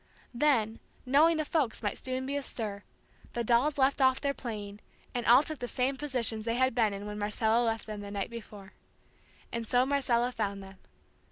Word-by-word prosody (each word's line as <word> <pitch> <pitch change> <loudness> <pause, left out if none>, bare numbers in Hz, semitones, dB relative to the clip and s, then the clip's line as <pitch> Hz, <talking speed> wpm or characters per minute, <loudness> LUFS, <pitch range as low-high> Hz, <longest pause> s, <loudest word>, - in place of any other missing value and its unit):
Then, 235 -4 +2 0.3
knowing 305 +6 +5
the 310 - -1
folks 285 -9 -1
might 205 - -3
soon 260 0 -2
be 280 +2 -2
astir, 220 -7 -4 0.5
the 240 - -1
dolls 245 +6 +2
left 275 +1 +2
off 260 0 +4
their 280 -1 0
playing, 210 -6 -6 0.3
and 245 -1 -2
all 250 +4 +8
took 310 -1 -6
the 245 - -3
same 255 +3 0
positions 250 -6 -1
they 230 +1 -1
had 260 +1 +2
been 225 -4 +2
in 200 +1 -6
when 210 0 -5
Marcella 220 +2 +1
left 225 -1 -1
them 215 -1 -6
the 200 - -7
night 200 +1 -3
before. 210 -4 -10 0.8
And 230 -1 -4
so 250 +2 +3
Marcella 250 -3 +1
found 200 -4 -3
them. 195 0 -12
235 Hz, 190 wpm, -30 LUFS, 215-265 Hz, 0.8 s, all